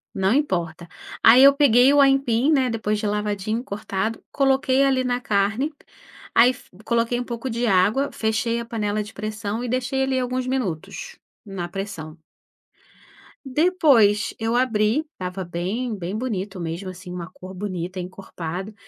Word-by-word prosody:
Não 190 +2 +2
importa. 175 - -1 0.3
Aí 245 +4 +8
eu 280 - +9
peguei 275 -1 +5
o 290 - +4
aipim, 270 -1 +3
né, 265 -5 +3
depois 215 -2 -1
de 210 - -4
lavadinho 210 +2 -1
cortado, 215 -1 -4
coloquei 270 -1 +2
ali 265 -1 +2
na 245 -1 0
carne. 220 +7 0 0.6
Aí 245 +2 +6
fu - - -17 0.2
coloquei 235 +1 +1
um 245 - -2
pouco 240 +2 -5
de 235 +1 -1
água, 205 +9 +3
fechei 220 +1 -1
a - - -7
panela 210 -2 -2
de 210 - -11
pressão 215 +1 -4
e 250 - -3
deixei 255 +2 0
ali 265 -1 0
alguns 255 0 -2
minutos, 260 - -4 0.3
na 190 -4 -5
pressão. 175 -5 -6 1.3
Depois 265 - +3
eu 225 +1 0
abri. 245 +3 +1
Estava 185 0 -5
bem 195 +8 -3
bem 190 +2 -4
bonito 200 -6 -4
mesmo, 170 +3 -4
assim, 185 0 -10
uma 180 0 -6
cor 185 +1 -11
bonita, 185 -1 -5
encorpado. 180 +1 -6
220 Hz, 155 wpm, -23 LUFS, 195-255 Hz, 1.3 s, eu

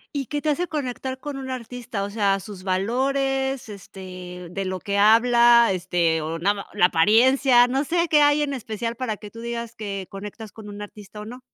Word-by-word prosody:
¿Y 275 -1 -1
qué 290 +3 -3
te 305 - -1
hace 345 +4 0
conectar 260 -3 -4
con 285 0 -6
un 260 -1 -6
artista?, 245 -3 -5
o 200 - -4
sea, 200 -2 +1
sus 195 -1 -10
valores, 265 +6 -1
este, 180 -2 -9
de 195 +2 -4
lo 185 0 -3
que 200 +1 -2
habla, 235 +2 +6
este, 175 -3 0
o 165 +1 -4
nada 200 +4 +2
má - - -19
la 195 -4 +4
apariencia, 245 - +5
no 270 +3 0
sé 340 +3 0
qué 295 -2 +5
hay 290 +1 +4
en 285 -1 -1
especial 230 0 -4
para 225 -4 -3
que 210 - -10
tú 230 - -12
digas 235 0 -5
que 195 -3 -5
conectas 205 +2 -8
con 215 -2 -12
un 205 0 -8
artista 205 0 -10
o 210 - -7
no. 245 +4 -9
225 Hz, 210 wpm, -23 LUFS, 195-260 Hz, -, habla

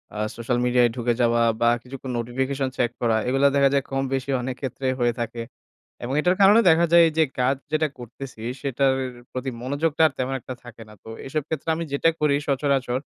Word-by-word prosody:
আ - - -4 0.2
social 120 +1 -1
মিডিয়ায় 125 -1 +3
ঢুকে 120 -1 0
যাওয়া, 115 0 +3 0.2
বা 120 - +5
কিছুক্ষণ 130 0 -7
নোটিফিকেশন 130 +3 -2
চেক 120 -1 +1
করা। 115 -2 +2
এগুলা 135 +2 +3
দেখা 140 -1 +4
যায় 140 -1 +2
কম-বেশি 135 0 -2
অনেক 125 +1 -4
ক্ষেত্রেই 130 0 -2
হয়ে 120 -1 +2
থাকে। 115 0 -4 0.6
এবং 125 - -3
এইটার 180 +3 +2
কারণে 205 +4 +7
দেখা 165 +1 +4
যায় 170 0 +8
এই - - -5
যে 160 - +6 0.2
কাজ 130 +2 +2 0.2
যেটা 155 0 +2
করতেছি 120 0 -10 0.2
সেটার 135 0 +1
এর 130 - -5 0.2
প্রতি 130 +1 -3
মনোযোগটা 145 +5 0
আর - - -15
তেমন 130 +1 -2
একটা 130 - -7
থাকে 120 -1 -12
না। 105 - -14
তো - - -12 0.2
এসব 150 +3 -2
ক্ষেত্রে 160 0 -5
আমি 165 - -3
যেটা 140 +3 +2
করি 150 -2 +3
সচরাচর, 135 -2 0
130 Hz, 200 wpm, -23 LUFS, 120-140 Hz, 0.6 s, যায়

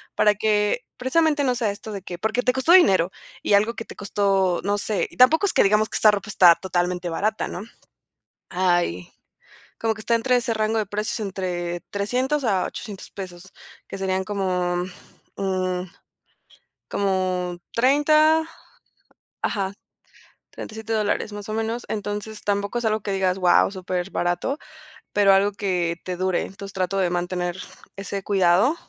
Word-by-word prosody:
para 210 -1 +4
que, 210 +2 +1 0.2
precisamente, 295 +3 +2
no 250 - +2
sea 225 -4 0
esto 215 +2 -8
de 195 - -5
que, 175 -1 -7
porque 220 +5 0
te 250 - +2
costó 265 +7 +3
dinero 190 - +5 0.3
y - - 0
algo 215 +4 +3
que 225 - -6
te - - -11
costó, 195 -3 +1
no 205 +1 0
sé, 205 0 -1
y - - -17
tampoco 310 +10 +6
es - - 0
que - - +5
digamos 210 +2 +3
que - - -6
esta 215 - +6
ropa 205 +1 -3
está 175 -5 +7
totalmente 180 -1 -2
barata, 215 +6 -1
¿no?, 180 - -6 0.9
hay, 175 - 0 0.7
como 225 -1 0
que 220 - -11
está 235 +2 0
entre 250 +2 +2
ese 240 -1 0
rango 215 0 0
de 215 - +1
precios 210 +3 -3
entre 175 -3 -3
300 255 +8 -1
a 195 -5 +1
800 205 -4 -8
pesos, 185 -1 -9 0.4
que - - -6
serían 190 0 -1
como, 180 -3 -1 0.5
mm, 185 -2 -1 1.1
como 185 -2 -1 0.2
30 305 +5 +4 1.0
ajá, 195 -2 -1 0.8
37 220 +1 -8
dólares 215 0 0
más 205 -1 -7
o - - -3
menos, 225 +2 -2
entonces 210 +1 -4
tampoco 200 +3 -1
es 240 - -6
algo 215 0 +1
que 200 - -3
digas 190 -1 +1
wao, 180 +1 +4
super 185 -1 -3
barato, 175 +11 -1 0.6
pero 205 -1 +5
algo 200 +1 +3
que 180 -4 -1
te 180 -1 -3
dure, 185 0 0
entonces 195 +1 -8
trato 190 0 -1
de 185 -2 +1
mantener 175 0 -2 0.4
ese 195 0 -5
cuidado, 195 - +3
200 Hz, 160 wpm, -23 LUFS, 185-220 Hz, 1.1 s, está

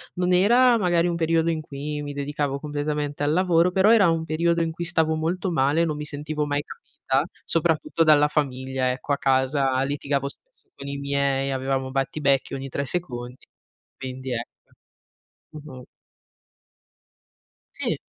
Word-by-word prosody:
non 180 0 +1
era 235 +6 +5
magari 175 -4 +2
un 170 - -1
periodo 165 0 +1
in 160 -1 -1
cui 150 0 -5
mi 145 - -5
dedicavo 140 0 -2
completamente 145 0 -3
al 145 - +2
lavoro, 180 0 +3
però 195 +3 +4
era 205 -7 +6
un 165 0 0
periodo 170 +1 +1
in 165 -1 -1
cui 165 +2 -5
stavo 160 -2 +1
molto 175 +4 -2
male, 145 +2 +2
non 155 -2 -2
mi 150 - -5
sentivo 150 +1 -3
mai 145 0 -1
capita, 135 0 -3 0.2
soprattutto 165 0 +1
dalla 150 -2 +5
famiglia 130 -3 -1
ecco, 130 +3 -3
a 140 - +1
casa 130 0 +1
litigavo 140 0 -1
spesso - - -12
con - - -7
i 140 0 -4
miei, 140 -1 0
avevamo 130 0 -2
battibecchi 135 0 0
ogni 135 0 -4
3 140 +2 -3
secondi, 125 -7 -4 0.5
quindi 130 0 -5
ecco. 120 0 -4 1.1
Mh-mh. 130 -4 -11 2.0
Sì. - - -1
150 Hz, 150 wpm, -24 LUFS, 135-165 Hz, 2.0 s, era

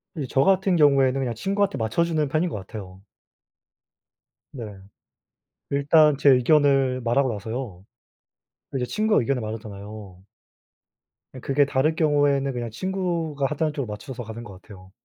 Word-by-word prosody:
이제 140 -5 -4
저 135 - +2
같은 190 -1 +3
경우에는 135 -4 +4
그냥 120 -3 -2
친구한테 200 - -1
맞춰주는 155 +7 0
편인 160 +5 0
것 - - -6
같아요. 95 -1 -10 1.5
네. 120 -5 -7 1.1
일단 145 +1 +4
제 140 - +5
의견을 135 0 +3
말하고 125 +2 +1
나서요, 110 -2 -6 0.9
이제 125 -2 0
친구가 215 - +1
의견을 130 +1 -1
말하잖아요. 105 -3 -8 1.1
그 130 - -10
그게 140 +2 +2
다를 140 +3 +1
경우에는 145 -3 +2
그냥 120 -1 -4
친구가 170 - -2
하자는 150 0 -1
쪽으로 140 -5 -4
맞춰서 120 +4 -7
가는 115 +1 -8
것 95 -4 -12
같아요. 95 -3 -15
135 Hz, 320 characters per minute, -24 LUFS, 110-150 Hz, 1.5 s, 제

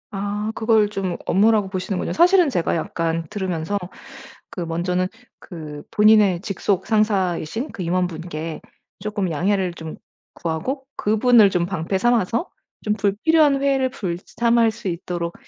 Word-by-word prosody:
아 205 +2 -2
그걸 220 -2 +3
좀 190 -4 -3
업무라고 210 +1 +3
보시는군요. 185 0 -3
사실은 355 -1 +5
제가 175 -9 0
약간 165 0 -2
들으면서 185 -1 -2 0.7
그 - - -9
먼저는 175 +2 -1 0.3
그 155 -4 -9
본인의 210 -4 +5
직속 195 0 -1
상사이신 210 - 0
그 - - -7
임원분께 165 -2 -3 0.4
쪼끔 205 -3 -2
양해를 185 +3 0
좀 160 -2 -8 0.4
구하고 255 - -3
그분을 220 0 +5
좀 175 -1 +1
방패 185 +1 -2
삼아서 235 - +1 0.3
좀 210 - +1
불필요한 275 +9 +3
회의를 270 -2 +2
불참할 230 +4 0
수 220 -2 -8
있도록 170 0 -4
195 Hz, 295 characters per minute, -22 LUFS, 175-220 Hz, 0.7 s, 사실은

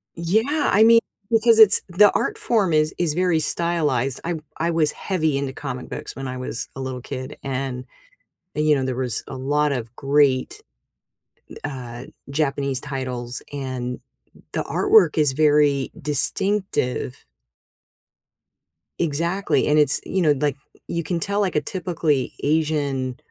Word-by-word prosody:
Yeah, 220 - +1
I 215 - +6
mean, 230 +1 +7 0.3
because 225 0 +4
it's 210 -2 +8
the 205 +3 +5
art 425 - -1
form 215 - +1
is 155 0 +2
is 170 -4 +1
very 175 -1 +1
stylized, 150 -7 0
I 170 0 -2 0.2
I 170 +1 0
was 160 -2 +2
heavy 160 -7 -1
into 140 -1 -3
comic 130 -3 -6
books - - -6
when 135 0 -5
I 130 0 -5
was 125 -2 -3
a 135 - -6
little 130 -1 -5
kid, 130 0 -7
and 130 -1 -4 0.7
and, 150 +1 0
you 150 - +5
know, 135 -2 -1
there 130 -1 -2
was 125 -3 -1
a 135 - -6
lot 145 +3 0
of 120 -3 -5
great, 140 -2 +1 1.0
uh, 125 -3 -6 0.2
Japanese 140 -2 -1
titles 130 -3 -5
and 130 -3 -4 0.5
the - - -1
artwork 410 - +3
is 150 -3 +3
very 145 -2 +3
distinctive. 150 -2 -1 1.7
Exactly, 170 +5 0
and 150 +1 +4
it's 145 -2 +3
you 190 - -1
know, 155 -4 +4
like, 145 -2 0 0.3
you 170 0 -2
can 170 +2 -2
tell, 200 +4 -1
like, 195 -4 0
a, 150 - +2
typically, 165 -4 -1
Asian 145 -4 0
150 Hz, 145 wpm, -22 LUFS, 130-170 Hz, 1.7 s, it's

